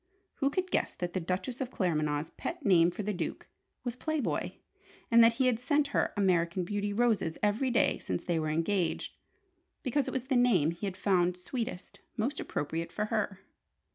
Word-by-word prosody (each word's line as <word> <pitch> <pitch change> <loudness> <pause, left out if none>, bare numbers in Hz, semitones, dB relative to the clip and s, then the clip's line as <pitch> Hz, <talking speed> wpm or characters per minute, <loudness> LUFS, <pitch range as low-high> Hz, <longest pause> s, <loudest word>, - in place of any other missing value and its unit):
Who 275 - +2
could 370 +5 -2
guess - - 0
that 175 -1 -4
the 185 - 0
Duchess 185 +9 -3
of 255 - -2
Claremanagh's 155 - 0
pet 335 -3 -6
name 175 -4 +6
for 210 +4 -5
the 210 +1 -1
Duke 180 - -4 0.4
was 245 -2 -3
"Play 315 +4 -2
Boy," 270 - -2 0.5
and 230 0 +8
that 230 0 +6
he 260 +3 +1
had 245 -3 +2
sent 285 +3 +1
her - - +1
"American 180 -2 +2
Beauty" 205 +2 -2
roses 215 -7 +1
every 215 +6 +2
day 235 - +2
since 90 - -3
they 170 -2 0
were 155 -1 -1
engaged, 165 +3 0 0.7
because 275 +1 0
it - - -2
was 260 - -2
the 265 0 0
name 210 -11 +4
he 170 +4 -4
had 185 -1 -5
found 180 -3 +2
sweetest, 225 +1 -5 0.2
most 250 +7 -1
appropriate 165 +3 -3
for 210 - -1
her? 205 -3 -1
205 Hz, 190 wpm, -31 LUFS, 175-245 Hz, 0.7 s, and